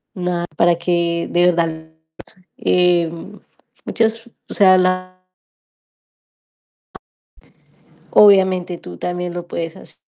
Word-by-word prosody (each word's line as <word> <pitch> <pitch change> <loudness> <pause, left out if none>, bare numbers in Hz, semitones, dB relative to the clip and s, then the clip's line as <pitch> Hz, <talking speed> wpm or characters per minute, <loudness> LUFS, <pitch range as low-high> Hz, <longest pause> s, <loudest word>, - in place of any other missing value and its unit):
nada, 180 -1 -3
para 170 +1 +3
que 170 -1 -1
de 175 0 +3
verdad, 165 -2 -1 0.7
eh, 175 -2 +2 0.7
muchas, 225 +1 -2 0.2
o - - -7
sea, 190 -3 +5
la 185 0 -2 2.9
Obviamente 190 -3 +4
tú 90 - -11
también 180 0 -4
lo 175 0 -7
puedes 165 -2 -5
hace - - -14
180 Hz, 95 wpm, -18 LUFS, 170-185 Hz, 2.9 s, sea